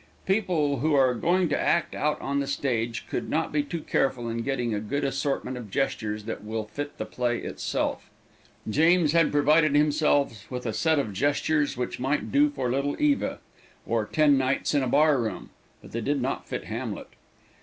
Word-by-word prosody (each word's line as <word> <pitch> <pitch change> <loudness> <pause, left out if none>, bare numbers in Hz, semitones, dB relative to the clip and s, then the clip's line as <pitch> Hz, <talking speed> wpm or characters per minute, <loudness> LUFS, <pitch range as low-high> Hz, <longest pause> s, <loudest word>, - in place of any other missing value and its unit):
People 175 - +1
who 155 +3 +2
are 130 -2 +4
going 175 +8 +1
to - - 0
act 170 0 +1
out 150 0 0
on 140 +1 -1
the 140 - -2
stage 120 -4 -2
can - - -3
not 160 +1 0
be 150 - +2
too 160 +3 -5
careful 130 -5 0
in 115 0 -3
getting 120 -3 -1
a 105 - -1
good 125 +8 -3
assortment 135 -1 -2
of 115 -4 -8
gestures 105 -3 -2
that 110 -1 -6
will 110 0 -3
fit 145 +7 -6
the - - -3
play 120 -1 -1
itself. - - -3 0.6
James 160 +6 +4
had 165 -1 +3
provided 150 +1 +4
himself 145 -6 +2
with 125 -1 -5
a 110 - -1
set 160 +6 +2
of 115 -8 -1
gestures 145 +4 +1
which 125 - -3
might 135 +4 -1
do 290 +2 +4
for 125 - -2
Little 140 +2 -1
Eva, 295 -1 +1 0.5
or - - 0
"Ten 150 -3 +4
Nights 135 +3 0
in 145 - +3
a 130 - 0
Bar 145 +2 +4
room," 110 -5 -5 0.3
but - - -13
they 115 - -3
did 140 +5 0
not 130 +2 -3
fit - - -3
Hamlet. - - -5
140 Hz, 190 wpm, -26 LUFS, 120-150 Hz, 0.6 s, are